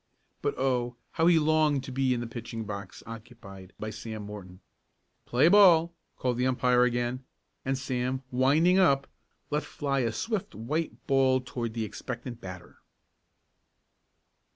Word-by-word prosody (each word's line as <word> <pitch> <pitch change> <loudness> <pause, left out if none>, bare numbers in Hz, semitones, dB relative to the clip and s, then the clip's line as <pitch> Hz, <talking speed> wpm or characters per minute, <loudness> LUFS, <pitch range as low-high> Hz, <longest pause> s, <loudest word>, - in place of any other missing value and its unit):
But - - -1
oh! 125 -2 0 0.2
how 165 - +2
he 175 -1 +6
longed 155 -3 +3
to 135 - -7
be 130 0 +1
in 120 -1 0
the - - -3
pitching 115 -1 -6
box 100 -2 -7
occupied 100 -4 -11
by 110 0 -4
Sam 110 0 -7
Morton! 100 -3 -9 0.7
"Play 125 +6 +4
ball!" 170 -4 +6 0.2
called 125 -2 -1
the 125 +1 +2
umpire 125 -1 +3
again, 120 +1 0 0.4
and 135 0 -1
Sam, 130 0 -2
"winding 150 +9 +4
up," 140 -7 +4 0.5
let 150 +1 +1
fly 140 -3 -2
a 115 -3 +1
swift 215 - -3
white 150 +9 -3
ball 135 -2 +3
toward 120 -2 -5
the 115 -1 -1
expectant 120 +1 -7
batter. 90 -2 -10
125 Hz, 145 wpm, -28 LUFS, 115-140 Hz, 0.7 s, he